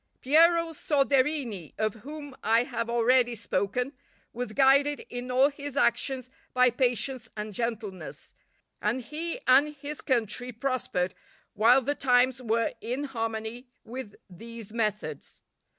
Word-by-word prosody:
Piero 330 +4 +4
Soderini, 275 - +1
of 215 -1 0
whom 290 0 -8
I 225 +3 +4
have 240 -2 -4
already 240 +1 +3
spoken, 215 +5 -1 0.4
was 245 -1 -4
guided 280 +3 +4
in 245 +1 -5
all 260 +3 +4
his 285 -1 -7
actions 260 -1 +1 0.3
by 250 0 +5
patience 245 -1 -1
and 210 0 -4
gentleness, 215 -4 -5 0.5
and 230 +5 0
he 320 +6 -4
and 285 +4 +5
his 290 +1 -6
country 245 -1 -1
prospered 230 -7 -2 0.4
while 240 +5 +5
the 285 - 0
times 255 -2 +3
were 230 -1 0
in 250 +5 -3
harmony 225 -1 -4 0.2
with 240 -3 -7
these 225 +3 -10
methods. 215 -2 -3
250 Hz, 125 wpm, -28 LUFS, 225-275 Hz, 0.5 s, by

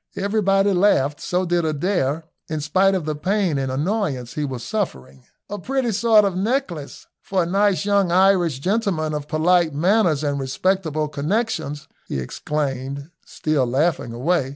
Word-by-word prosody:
Everybody 200 0 +2
laughed, 150 -7 +2
so 180 +1 -1
did 175 -1 +1
Adair, 155 -1 0 0.3
in 155 -1 -2
spite 190 +6 +2
of 180 -5 -2
the 155 - -1
pain 180 0 0
and 135 -1 -2
annoyance 145 - -2
he 150 - -2
was 130 -4 -4
suffering. 65 - -4 0.2
"A 205 - -5
pretty 260 -3 -1
sort 220 0 +4
of 195 - 0
a - - -5
necklace 195 - -2 0.2
for 190 -2 0
a - - -2
nice 200 +2 +1
young 200 -3 +2
Irish 180 -5 +3
gentleman 180 -2 -1
of 150 -1 -4
polite 165 0 +2
manners 175 -2 +2
and 145 -1 -1
respectable 155 +3 -1
connexions," 150 -2 -2 0.2
he - - -3
exclaimed, 140 - -4 0.2
still 150 -5 0
laughing 135 0 0
away. 135 +4 0
170 Hz, 155 wpm, -22 LUFS, 145-195 Hz, 0.3 s, sort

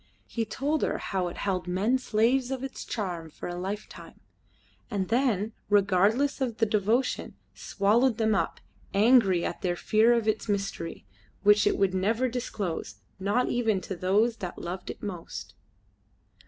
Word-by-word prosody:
He 230 -2 -3
told 285 +7 -1
her - - 0
how 185 -2 -2
it 175 - -7
held 185 -3 -2
men 205 +9 +1
slaves 245 +2 +2
of 265 -1 -3
its 270 - -6
charm 175 -7 -4
for - - -8
a 175 - -4
lifetime, 195 +4 -6 0.7
and 200 -5 -2
then, 225 -4 +1 0.2
regardless 205 +8 +3
of 240 -4 -1
their 225 - +2
devotion, 215 +5 0 0.2
swallowed 225 +4 +2
them 220 -2 +2
up, 200 - -1 0.4
angry 200 -5 +5
at - - -4
their 175 -1 0
fear 220 +6 +3
of 230 -2 0
its 215 0 0
mystery, 195 - -3 0.4
which 205 0 +5
it - - +2
would 195 -1 +2
never 220 +7 +1
disclose, 205 - -4 0.2
not 205 +6 +1
even 225 -5 +1
to 190 - -5
those 210 +6 +2
that 180 -2 -6
loved 180 +2 -6
it - - -8
most. 180 -5 -6
210 Hz, 155 wpm, -28 LUFS, 190-235 Hz, 0.7 s, angry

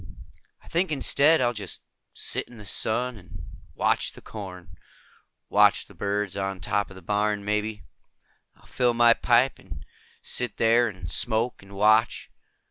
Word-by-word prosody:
"I - - -20
think 175 +1 0
instead, 150 +1 +4
I'll 120 -1 +1
just 100 -5 -7 0.3
sit - - -3
in 120 - -15
the 105 - -11
sun 120 +4 -1
and 90 -2 -12 0.3
watch - - 0
the - - -12
corn. 90 -5 -9 0.7
Watch - - +4
the - - -17
birds 100 -1 -2
on 95 -1 -3
top 100 +3 -1
of 95 - -12
the 95 - -13
barn, 105 +1 -1
maybe. 105 -1 -2 0.7
I'll - - -24
fill 125 -2 0
my 120 0 +6
pipe 125 +3 +2
and 80 -6 -11 0.4
sit 125 0 -2
there 115 +1 +4
and 90 -5 -7
smoke 115 +6 0
and 100 0 -14
watch. 110 +3 +2
105 Hz, 155 wpm, -25 LUFS, 95-120 Hz, 0.7 s, my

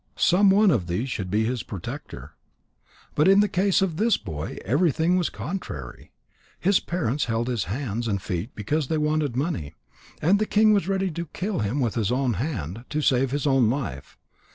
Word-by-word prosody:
Some 195 +3 +4
one 200 +1 +5
of 100 - 0
these 110 +10 -2
should 95 -5 -3
be 105 +3 +1
his 125 0 -1
protector. 95 -5 -8 0.8
But 150 - +3
in 195 +1 +6
the 210 - +4
case 195 0 +2
of 170 -5 -2
this 225 +3 +3
boy 75 -1 -6
everything 160 - +2
was 180 -2 +1
contrary. 75 - -7 0.5
His 195 +1 +3
parents 150 -6 -1
held 115 0 -1
his 120 -8 -1
hands 115 - -3
and 100 -3 0
feet 90 +5 -4
because 145 +8 -1
they 160 - 0
wanted 150 -4 0
money. 130 - -2 0.4
And 190 +6 +3
the 215 - 0
king 215 0 +4
was 200 -4 +1
ready 195 -1 0
to 170 +1 -5
kill 190 +4 -3
him 105 +7 -1
with 120 -5 0
his 110 -2 0
own 130 -1 +1
hand, 115 - -4
to 155 +1 -1
save 130 0 +3
his 145 +3 -2
own 135 -5 +4
life. 115 - -4
140 Hz, 190 wpm, -25 LUFS, 110-180 Hz, 0.8 s, in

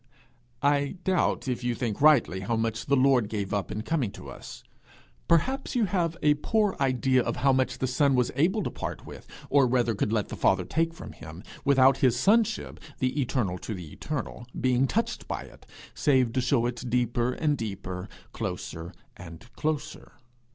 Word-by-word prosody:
I 145 +2 +2
doubt 185 -7 +1
if 125 -1 -2
you 120 -1 0
think 115 -3 -3
rightly 145 -11 +5
how 100 +5 -1
much 115 0 -2
the 140 - +4
Lord 130 -5 +3
gave 100 -3 -3
up 100 -1 -1
in 110 - -4
coming 145 -8 0
to - - -10
us. - - -10 0.6
Perhaps 260 - +1
you 235 -3 +3
have 175 -3 -1
a 150 0 +6
poor 205 +7 0
idea 130 -1 +2
of - - -2
how 135 +2 +3
much 130 0 0
the - - -1
Son 135 +2 +2
was 125 -1 +1
able 185 +9 +2
to - - -3
part - - -6
with, - - -11 0.2
or 140 -2 +5
rather 120 -2 +2
could 105 +1 -1
let 110 -3 0
the - - -5
Father 95 -2 +2
take 165 - 0
from 180 - -9
him, 85 +3 -11 0.2
without 135 -2 +5
his 125 -2 +2
sonship, 220 - +2 0.2
the 130 +3 0
eternal 110 -9 -1
to 110 - -5
the 85 -5 -9
eternal, 125 -5 -5
being 130 +1 +2
touched 230 +9 -2
by - - -4
it, - - -16 0.3
save 130 -5 +2
to 130 - +1
show 125 -1 +2
it 120 0 -4
deeper 120 0 +1
and 150 -2 +1
deeper, 95 -4 -5 0.2
closer 85 +2 -5 0.2
and 95 +7 -12
closer. 155 -1 -3
130 Hz, 185 wpm, -27 LUFS, 115-150 Hz, 0.6 s, a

